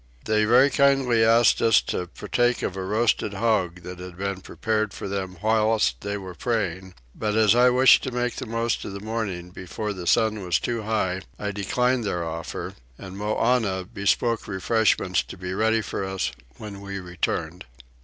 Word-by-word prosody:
They 110 0 +2
very 125 +5 +5
kindly 135 -4 +3
asked 115 +1 +4
us 115 -1 +5
to 90 - -3
partake 120 +7 0
of 95 - -2
a 95 - -4
roasted 105 +1 0
hog 95 -5 0
that 90 0 -8
had 90 -1 -9
been 100 0 -3
prepared 110 -1 -2
for - - -6
them 95 -2 -4
whilst 110 - +2
they 100 0 -3
were 95 -2 -8
praying; 95 -4 -3 0.2
but 105 -1 -2
as 110 -2 +5
I 125 +1 +5
wished 130 +1 +6
to 130 - -3
make 125 0 -2
the 130 - -5
most 115 +1 -1
of 100 - -6
the 100 - -6
morning 100 -5 -4
before 105 +4 -5
the 90 -3 -7
sun 110 +2 +2
was 90 -2 +1
too 115 -2 -2
high 105 -4 -1 0.2
I 105 0 -3
declined 125 +5 0
their 90 -5 -2
offer, 80 0 -5 0.2
and 95 -1 -9
Moannah 105 -2 0
bespoke 105 +3 0
refreshments 105 +3 +1
to - - -11
be 90 0 -5
ready 110 +3 +2
for 100 - -4
us 95 0 -2 0.3
when 100 -2 -8
we 100 0 -5
returned. 90 -1 -3
105 Hz, 180 wpm, -24 LUFS, 95-115 Hz, 0.3 s, wished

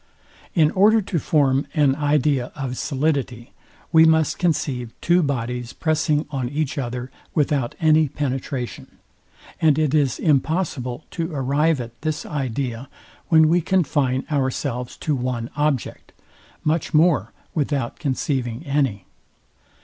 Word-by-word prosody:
In 155 -3 +4
order 215 +4 +5
to 190 -4 -2
form 140 -3 +2
an 145 -3 +3
idea 145 -3 +1
of 135 -3 -4
solidity, 135 -4 -2 0.4
we 160 -1 +7
must 160 -2 +3
conceive 130 -9 -1
two 175 +2 +3
bodies 125 -4 -2
pressing 155 -1 0
on 130 -4 -2
each 145 0 -2
other 125 0 -4 0.2
without 140 -5 0
any 155 -1 +4
penetration; 130 -3 -4 0.6
and 155 -3 +4
it 155 -3 +1
is 140 -5 +2
impossible 150 -3 0
to 165 0 -3
arrive 145 +2 +1
at 120 +1 -8
this 155 0 -2
idea, 130 -2 -3 0.4
when 160 -2 +6
we 170 +2 +3
confine 145 -7 +1
ourselves 130 -3 -2
to 155 - -1
one 125 -2 -3
object, 145 -4 -2 0.5
much 160 0 0
more 150 - +3 0.2
without 140 -5 -2
conceiving 130 -3 -2
any. 135 -9 0
140 Hz, 125 wpm, -22 LUFS, 125-155 Hz, 0.6 s, we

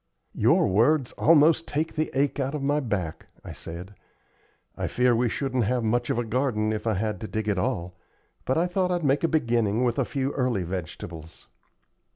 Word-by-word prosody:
"Your - - +3
words 120 +7 +3
almost 160 +1 +4
take 155 +3 -2
the 155 0 -1
ache 140 +1 +1
out 135 +2 -1
of 145 - -4
my 145 +2 +2
back," 100 - -3 0.2
I - - -7
said. 90 +4 -9 0.8
"I - - -3
fear 125 -1 +2
we 120 +1 +1
shouldn't 130 -2 -1
have 125 +2 0
much 120 +2 0
of - - 0
a 120 - +1
garden 110 -2 0
if 110 +1 -4
I 110 - +2
had 105 +3 -2
to 110 - -4
dig 110 0 -3
it 100 -3 +1
all, 90 0 -2 0.5
but 130 - 0
I 170 - +3
thought 180 +1 0
I'd 175 -3 -1
make 140 +2 +2
a - - +4
beginning 120 -7 +1
with 120 -2 0
a - - +3
few 135 -1 -2
early 125 -9 0
vegetables." 85 -2 -7
120 Hz, 195 wpm, -26 LUFS, 105-145 Hz, 0.8 s, almost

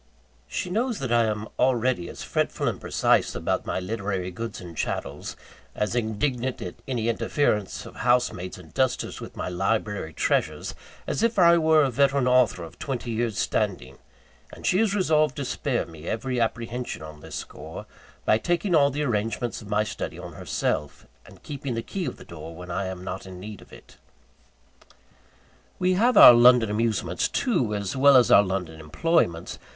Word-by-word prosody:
She 180 - -4
knows 235 +3 0
that 130 -3 -4
I 120 -1 +4
am 110 0 -2
already 125 -7 +1
as - - -8
fretful - - -1
and - - -2
precise - - +2
about - - -2
my - - -1
literary 95 -2 -3
goods 115 +5 -6
and 85 -2 -10
chattels, 70 -1 -4 0.4
as 105 +1 -1
indignant 120 +3 -1
at 90 - -6
any 120 -4 -1
interference 115 -3 0
of - - -11
housemaids 120 -7 0
and 90 -4 -14
dusters 130 -2 -1
with - - -9
my - - -4
library 95 -1 -1
treasures, - - 0 0.3
as - - -2
if 230 -1 +1
I 170 -2 +6
were 160 -1 +5
a 135 - +1
veteran 135 0 +2
author 125 -8 +3
of 80 - -11
twenty 125 -3 -4
years' 115 -2 -1
standing; - - -1 0.5
and - - -11
she 185 - +3
is 215 -2 +2
resolved 155 -7 +2
to 140 - -4
spare 130 -1 -1
me 80 -1 -11
every 125 +2 -1
apprehension 115 -2 -3
on 75 -1 -10
this - - -9
score, - - -8 0.4
by 110 - +4
taking 175 - 0
all 140 -3 +5
the 145 +2 -2
arrangements 115 -1 -2
of 105 - -11
my 105 0 +2
study 105 - -5
on - - -8
herself, 75 -1 -3 0.2
and - - -16
keeping 140 -4 -5
the 115 - -3
key 190 -3 -4
of 130 - -4
the - - -13
door 80 0 -9
when 90 +1 -8
I 95 +2 -2
am 95 -1 -6
not 95 +1 -6
in 90 -1 -9
need 105 +2 -9
of - - -17
it. - - -15 1.8
We 185 0 +2
have 235 +7 +3
our 125 - +12
London 120 -2 +6
amusements, 105 -5 0
too, 130 - 0
as 100 +1 -3
well 140 0 +7
as 125 - +4
our - - +9
London 90 -5 -3
employments. 85 - 0
115 Hz, 180 wpm, -25 LUFS, 95-135 Hz, 1.8 s, our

